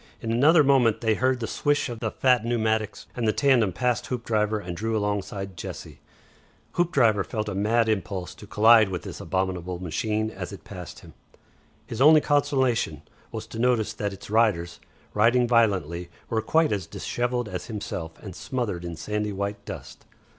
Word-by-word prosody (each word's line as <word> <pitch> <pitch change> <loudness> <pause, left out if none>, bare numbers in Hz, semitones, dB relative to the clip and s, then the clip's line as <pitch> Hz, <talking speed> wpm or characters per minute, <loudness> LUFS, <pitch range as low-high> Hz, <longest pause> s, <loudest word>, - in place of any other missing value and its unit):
In 115 - -3
another 150 +7 +5
moment 130 -5 +3
they 110 -2 +2
heard 130 +3 +1
the 115 - -2
swish 145 +5 0
of 120 -3 -6
the 110 - -1
fat 125 0 +2
pneumatics 110 -2 -1
behind - - -25
them, - - -4
and 115 - +1
the 110 - +1
tandem 125 -8 +4
passed 120 +5 -1
Hoopdriver 110 -3 0
and 90 -3 -6
drew 110 +4 -1
alongside 100 -2 -3
Jessie. - - -8 0.7
Hoopdriver 130 - +2
felt 110 0 -4
a 105 - -3
mad 110 +4 +2
impulse 95 -3 -2
to 105 - -13
collide 110 0 +6
with 90 -3 -4
this - - -7
abominable 90 -1 -2
machine 105 +5 -2
as 95 -2 -7
it 100 - -10
passed 90 -5 -9
him. - - -14 0.7
His 115 - -5
only 155 +2 +8
consolation 130 - +1 0.3
was 110 -1 -5
to 110 +1 -8
notice 115 -3 +2
that 105 -1 -3
its 100 +1 -10
riders, 95 -7 +1 0.3
riding 120 +3 +4
violently, 95 -8 +1 0.2
were 110 -1 +1
quite 160 +7 +2
as 100 -2 -2
dishevelled 120 -1 -2
as 90 -3 -6
himself 95 -7 -5
and 95 -5 -8
smothered 115 -9 -3
in 85 -1 -5
sandy 105 +5 -3
white 100 +1 -4
dust. - - -9
110 Hz, 175 wpm, -25 LUFS, 100-120 Hz, 0.7 s, only